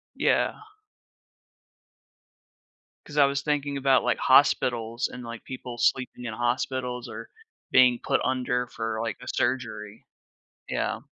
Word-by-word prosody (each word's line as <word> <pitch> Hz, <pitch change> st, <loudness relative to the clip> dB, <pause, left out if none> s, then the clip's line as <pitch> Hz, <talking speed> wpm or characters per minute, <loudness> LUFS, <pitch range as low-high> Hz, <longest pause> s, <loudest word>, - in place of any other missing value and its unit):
Yeah. -, -, +2 dB, 2.5 s
'Cause 150 Hz, -, -10 dB
I 145 Hz, -, +7 dB
was 140 Hz, 0 st, 0 dB
thinking 145 Hz, -1 st, -1 dB
about, 135 Hz, -1 st, +3 dB
like, -, -, +2 dB
hospitals 120 Hz, -3 st, +3 dB
and, 125 Hz, -, -8 dB
like, 115 Hz, -1 st, -8 dB
people 125 Hz, -2 st, -7 dB
sleeping 125 Hz, +1 st, 0 dB
in 115 Hz, -, -4 dB
hospitals 125 Hz, +1 st, -2 dB
or -, -, -8 dB, 0.4 s
being 125 Hz, -2 st, +6 dB
put 135 Hz, -, +1 dB
under 125 Hz, -1 st, 0 dB
for, 110 Hz, -2 st, -4 dB
like, 115 Hz, -, -3 dB
a -, -, -11 dB
surgery. 115 Hz, -4 st, -2 dB, 0.6 s
Yeah. -, -, -2 dB
125 Hz, 125 wpm, -26 LUFS, 120-130 Hz, 2.5 s, I